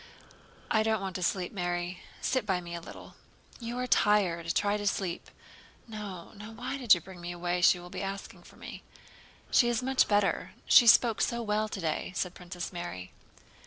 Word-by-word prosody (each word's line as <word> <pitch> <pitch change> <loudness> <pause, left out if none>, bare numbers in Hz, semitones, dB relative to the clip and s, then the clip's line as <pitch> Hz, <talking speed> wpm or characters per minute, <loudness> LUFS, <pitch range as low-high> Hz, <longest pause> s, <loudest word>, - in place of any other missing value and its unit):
"I 220 - +4
don't 220 0 +1
want 190 -1 -5
to - - -7
sleep, 180 0 -1
Mary, 175 -1 -3 0.2
sit 260 -1 +1
by 190 -4 0
me 170 -1 -8
a 170 - -5
little." - - -11 0.5
"You 235 0 -5
are 250 - -1
tired—try 205 -2 +2
to 205 0 -3
sleep." 185 -3 -2 0.6
"No, 205 -6 -7
no. 210 +2 -9
Why 255 +4 -5
did 235 -7 +6
you 175 - -6
bring 185 +1 -12
me 175 0 -5
away? 175 0 -2
She 175 - +6
will 175 0 -11
be - - -5
asking 195 0 -6
for - - -17
me." - - -9 0.7
"She 240 - +5
is 240 +1 0
much 265 0 +3
better. 205 -1 +1
She 240 - +7
spoke 230 -1 +6
so 235 0 0
well 215 0 0
today," 170 -2 -3
said 180 -1 -2
Princess 180 -1 -7
Mary. 175 - -6
195 Hz, 185 wpm, -30 LUFS, 175-220 Hz, 0.7 s, She